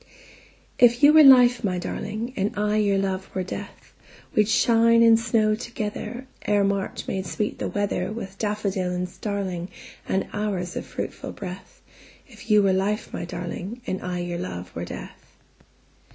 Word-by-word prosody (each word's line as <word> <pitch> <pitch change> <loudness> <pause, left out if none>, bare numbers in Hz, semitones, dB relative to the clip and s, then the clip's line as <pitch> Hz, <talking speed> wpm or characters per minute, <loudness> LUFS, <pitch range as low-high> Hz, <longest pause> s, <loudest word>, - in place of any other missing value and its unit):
If 240 +2 +5
you 295 +1 +8
were 315 - +9
life, 250 -3 +7
my 185 -3 0
darling, 215 +6 -4
And 200 +1 -2
I 210 +1 +1
your 200 -2 +2
love 190 -1 -2
were 185 - 0
death, 185 - -8 0.4
We'd 210 0 +3
shine 230 +1 +4
and 225 -1 +6
snow 220 -2 +2
togetherEre 230 +2 -5 0.4
March 195 -1 -2
made 190 -1 -3
sweet 210 +5 -3
the - - -2
weatherWith 200 0 -3
daffodil 200 -4 -1
and 180 0 -2
starlingAnd 190 -1 -4
hours 195 -4 -2
of - - -5
fruitful - - -6
breath; 185 -1 -9 0.4
If - - -15
you 210 -1 +5
were 195 -1 +3
life, 200 +3 -1
my - - -4
darling, 180 +6 -6
And 190 - -3
I 180 0 -3
your 175 0 -4
love 90 0 -6
were 85 +1 -4
death. - - -10
200 Hz, 150 wpm, -24 LUFS, 185-220 Hz, 0.4 s, were